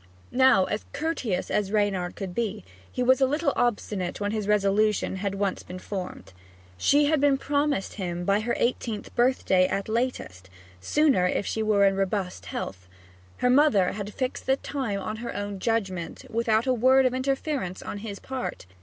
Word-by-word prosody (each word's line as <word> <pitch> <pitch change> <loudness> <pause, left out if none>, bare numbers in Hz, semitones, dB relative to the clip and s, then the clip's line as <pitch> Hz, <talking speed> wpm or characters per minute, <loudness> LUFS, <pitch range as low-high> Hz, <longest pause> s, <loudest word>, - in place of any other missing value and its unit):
Now, 260 -7 +5 0.3
courteous 285 - -2
as 205 -2 0
Reynard 200 -4 0
could 190 -2 -5
be, 220 - -3 0.3
he 250 - -1
was 260 +2 +4
a 265 - +5
little 295 +1 0
obstinate 205 -6 -1
when 205 0 -1
his 215 -2 -2
resolution 210 -1 +2
had 200 +1 -2
once 195 -1 -1
been 180 - -9
formed. 185 - -6 0.4
She 285 - +3
had 300 -1 +2
been 285 -1 +4
promised 285 -6 0
him 175 -3 -4
by 200 +2 +3
her 235 +2 -1
eighteenth 235 -3 -2
birthday 240 -7 +3
at 195 +1 -2
latest 220 - -3 0.3
sooner 270 - +3
if 190 - -1
she 220 - -2
were 210 -2 +3
in 195 0 +3
robust 190 - -2
health. 90 0 -6 0.5
Her 250 - +2
mother 255 -9 +4
had 205 0 -5
fixed 255 -2 -3
the 265 - +4
time 260 -8 -3
on 215 +3 -4
her 235 +1 -6
own 205 -1 -4
judgment, 190 -6 -2
without 225 0 +1
a 260 - +2
word 260 +2 +4
of 255 - +2
interference 265 - -2
on 205 - -5
his 205 -1 -6
part. 260 - -5
215 Hz, 170 wpm, -26 LUFS, 195-255 Hz, 0.5 s, Now